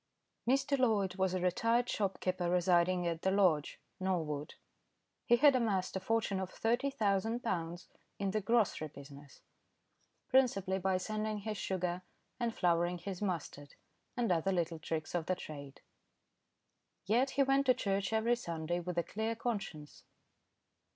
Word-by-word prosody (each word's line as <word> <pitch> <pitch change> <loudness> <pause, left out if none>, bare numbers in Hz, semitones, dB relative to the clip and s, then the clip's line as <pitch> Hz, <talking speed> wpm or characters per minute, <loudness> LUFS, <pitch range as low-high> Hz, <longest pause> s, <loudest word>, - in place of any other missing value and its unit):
Mr. 275 +2 +2
Loyd 210 -7 +2
was 190 -1 +1
a - - 0
retired 230 +7 +2
shopkeeper 185 -4 -1
residing 180 0 +3
at 165 -1 -2
The 190 - +2
Lodge, 185 -7 +2 0.2
Norwood. 160 -6 -2 0.7
He 240 - +7
had 280 +2 +6
amassed 205 -8 0
a - - 0
fortune 210 -1 0
of 190 -1 -3
thirty 240 +7 0
thousand 225 -2 0
pounds 175 -5 -3 0.3
in 195 -1 -1
the 215 +1 0
grocery 205 -6 +1
business, 140 -1 -13 0.9
principally 200 -8 +2
by 190 0 +1
sanding 215 +2 -3
his 210 -1 -4
sugar 180 -1 -2 0.4
and 235 -1 0
flouring 175 -2 +1
his 185 +2 -6
mustard, 160 -7 -4 0.4
and 235 -5 +1
other 175 +2 +2
little 170 -3 -1
tricks 155 -1 -4
of 170 -2 -1
the 185 - +1
trade. 140 -5 -9 1.2
Yet 240 +7 +3
he 275 - +6
went 275 +1 +2
to 255 - +6
church 195 -4 -1
every 225 +2 +2
Sunday 170 -5 -3
with 175 0 -5
a 170 - +2
clear 220 +6 -2
conscience. 195 -11 -5
190 Hz, 145 wpm, -34 LUFS, 175-225 Hz, 1.2 s, He